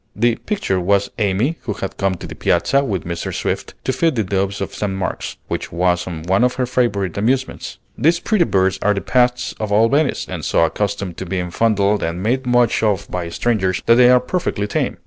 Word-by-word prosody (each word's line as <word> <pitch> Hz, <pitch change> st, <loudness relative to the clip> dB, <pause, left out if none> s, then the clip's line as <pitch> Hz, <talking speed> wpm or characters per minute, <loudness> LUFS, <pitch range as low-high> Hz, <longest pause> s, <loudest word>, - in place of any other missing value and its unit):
The 115 Hz, +1 st, +2 dB
"picture" 195 Hz, -, 0 dB
was 100 Hz, +2 st, +1 dB
Amy, 105 Hz, -, +1 dB
who 110 Hz, -, -3 dB
had 95 Hz, -, -6 dB
come 95 Hz, -1 st, 0 dB
to -, -, -9 dB
the -, -, -7 dB
Piazza 135 Hz, +11 st, +1 dB
with 100 Hz, -, -2 dB
Mrs. 85 Hz, -1 st, -4 dB
Swift, -, -, -3 dB
to 130 Hz, -, -1 dB
feed 160 Hz, +4 st, +1 dB
the 110 Hz, -, +1 dB
doves 100 Hz, +1 st, -1 dB
of 95 Hz, -, -4 dB
St. 105 Hz, -2 st, -2 dB
Mark's, 95 Hz, -1 st, -4 dB
which -, -, -4 dB
was 90 Hz, +1 st, +1 dB
one 90 Hz, +5 st, 0 dB
of 125 Hz, 0 st, +2 dB
her 130 Hz, -, 0 dB
favorite 105 Hz, -7 st, 0 dB
amusements. 130 Hz, +5 st, -1 dB, 0.2 s
These 170 Hz, +3 st, +2 dB
pretty 200 Hz, -3 st, +2 dB
birds 95 Hz, -4 st, +1 dB
are 105 Hz, 0 st, +2 dB
the 100 Hz, -, -2 dB
pets 125 Hz, -1 st, +1 dB
of 110 Hz, -1 st, -3 dB
all 110 Hz, +3 st, +4 dB
Venice, 145 Hz, +2 st, +1 dB
and -, -, -6 dB
so 85 Hz, -, +3 dB
accustomed 100 Hz, -1 st, -3 dB
to 95 Hz, -, -6 dB
being 90 Hz, -1 st, -3 dB
fondled 105 Hz, 0 st, +2 dB
and 85 Hz, +2 st, -3 dB
made 125 Hz, +4 st, 0 dB
much 120 Hz, -1 st, +3 dB
of 100 Hz, -3 st, 0 dB
by 90 Hz, -2 st, -3 dB
strangers, 95 Hz, -1 st, 0 dB
that 115 Hz, -, +6 dB
they 125 Hz, +1 st, +6 dB
are 125 Hz, 0 st, +6 dB
perfectly 125 Hz, -, -2 dB
tame. 105 Hz, -, -2 dB
105 Hz, 210 wpm, -19 LUFS, 95-125 Hz, 0.2 s, that